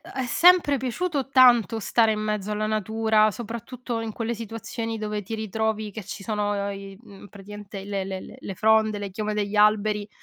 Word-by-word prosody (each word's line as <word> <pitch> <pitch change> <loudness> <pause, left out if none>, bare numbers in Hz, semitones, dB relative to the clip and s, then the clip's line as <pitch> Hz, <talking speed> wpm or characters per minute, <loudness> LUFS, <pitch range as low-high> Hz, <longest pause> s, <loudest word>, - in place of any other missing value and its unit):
è 265 - -4
sempre 335 +3 +5
piaciuto 270 +3 -2
tanto 240 -4 +5
stare 225 +1 +3
in 215 - -3
mezzo 210 -1 -2
alla 210 0 -1
natura, 215 0 +2
soprattutto 235 +2 -6
in 225 -1 -4
quelle 230 +1 -3
situazioni 225 +1 -5
dove 210 -1 -3
ti 215 +4 -6
ritrovi 220 0 -2
che 205 +1 -8
ci 200 +1 -7
sono, 205 0 -1
ehm, 200 0 -3
i 195 0 -10
mhmm, 200 -3 -14
praticamente 200 0 -10
le 200 -1 -3
le 190 0 -5
le - - -11
le 195 - -7
fronde, 220 +1 +3
le 200 -1 -5
chiome 210 +2 -3
degli 210 0 -2
alberi, 210 0 +3
215 Hz, 190 wpm, -25 LUFS, 205-225 Hz, -, sempre